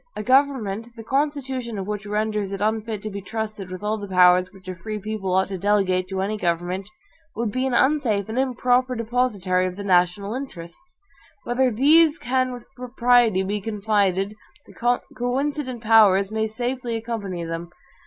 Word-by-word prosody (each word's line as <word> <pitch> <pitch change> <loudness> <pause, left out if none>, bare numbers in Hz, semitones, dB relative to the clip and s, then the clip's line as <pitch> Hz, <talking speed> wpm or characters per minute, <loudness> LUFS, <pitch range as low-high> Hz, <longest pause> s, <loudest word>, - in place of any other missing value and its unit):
A 210 - -4
government, 255 -5 +2
the 225 - -9
constitution 265 -4 -2
of 195 - -4
which 210 0 -4
renders 210 -1 -1
it 195 - -4
unfit 215 0 -1
to 215 - -4
be 200 0 -5
trusted 210 -1 -5
with 185 +2 -7
all 215 +1 -1
the 205 - -6
powers 180 -1 +5
which 190 -2 -17
a 185 - -3
free 215 +5 -6
people 210 -2 -4
ought 190 0 +3
to 190 -2 -4
delegate 190 -2 +1
to 190 0 -3
any 210 +2 -2
government, 180 +2 -2 0.5
would 230 -1 -1
be 255 +3 -1
an 255 - 0
unsafe 250 -9 +2
and 225 +3 -2
improper 255 -1 +1
depositary 215 -6 0
of 180 - -5
the 200 - -6
NATIONAL 185 +2 +2
INTERESTS. 255 - -9 0.5
Wherever 255 +2 +2
THESE 300 +7 +5
can 255 -2 0
with 245 -1 -8
propriety 245 -5 +3
be 205 +2 -2
confided, 205 -2 0 0.3
the 240 +1 0 0.2
coincident 255 0 -2
powers 210 -3 +5
may 220 0 0
safely 245 +1 -3
accompany 220 -6 -4
them. 165 +1 -5
215 Hz, 170 wpm, -23 LUFS, 195-245 Hz, 0.5 s, powers